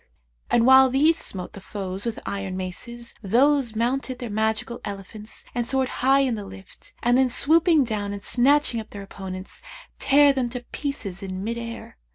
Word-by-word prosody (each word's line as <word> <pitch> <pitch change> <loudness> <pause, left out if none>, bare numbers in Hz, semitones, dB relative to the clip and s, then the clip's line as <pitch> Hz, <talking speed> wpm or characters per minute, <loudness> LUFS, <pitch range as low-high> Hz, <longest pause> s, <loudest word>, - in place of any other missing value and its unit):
And 235 -1 +3
while 265 0 +7
these 295 +6 +4
smote 185 - -3
the 200 - -10
foes 195 0 -5
with 230 - -3
iron 195 -2 -4
maces, 235 +6 -6
those 245 +3 +2
mounted 255 +3 -1
their 240 -3 -6
magical 220 +2 -1
elephants 205 +2 -7
and 240 -1 -2
soared 265 -1 +1
high 270 +2 +5
in 260 -3 +1
the 210 -2 -4
lift, 195 -1 -13
and 245 +1 +4
then 260 -1 +3
swooping 315 +4 +4
down 210 -4 -3
and 200 0 -6
snatching 265 -1 +3
up 220 - -8
their 200 -1 -8
opponents, 190 - -8 0.4
tare 285 0 +5
them 255 -3 -1
to 245 0 -7
pieces 225 -10 -4
in 190 -1 -5
mid 230 +2 -3
air. 230 - -8
235 Hz, 180 wpm, -24 LUFS, 200-265 Hz, 0.4 s, while